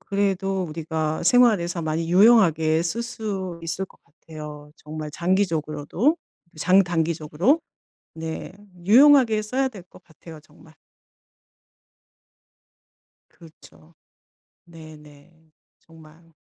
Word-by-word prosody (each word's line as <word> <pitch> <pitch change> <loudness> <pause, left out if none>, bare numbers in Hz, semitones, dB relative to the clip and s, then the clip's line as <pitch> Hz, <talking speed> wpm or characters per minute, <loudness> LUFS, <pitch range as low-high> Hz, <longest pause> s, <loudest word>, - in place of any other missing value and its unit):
그래도 195 -1 -1
우리가 160 -1 -4
생활에서 180 -5 +3
많이 160 +2 -3
유용하게 170 -7 +4
쓸 215 +8 -3
수 195 -7 -5
있을 170 +3 -3
것 - - -21
같아요. 150 -1 -11
정말 155 0 -8
장기적으로도 170 - -1 0.4
장단기적으로. 170 - +1 0.5
네. 160 +2 -7 0.3
유용하게 245 -1 +5
써야 260 +5 -1
될 205 -8 -11
것 180 +1 -19
같아요 160 0 -14
정말. 155 +1 -21 2.6
그렇죠. 165 0 -19 0.7
네네. 155 -1 -16 0.3
정말. 165 0 -19
170 Hz, 215 characters per minute, -23 LUFS, 155-195 Hz, 2.6 s, 유용하게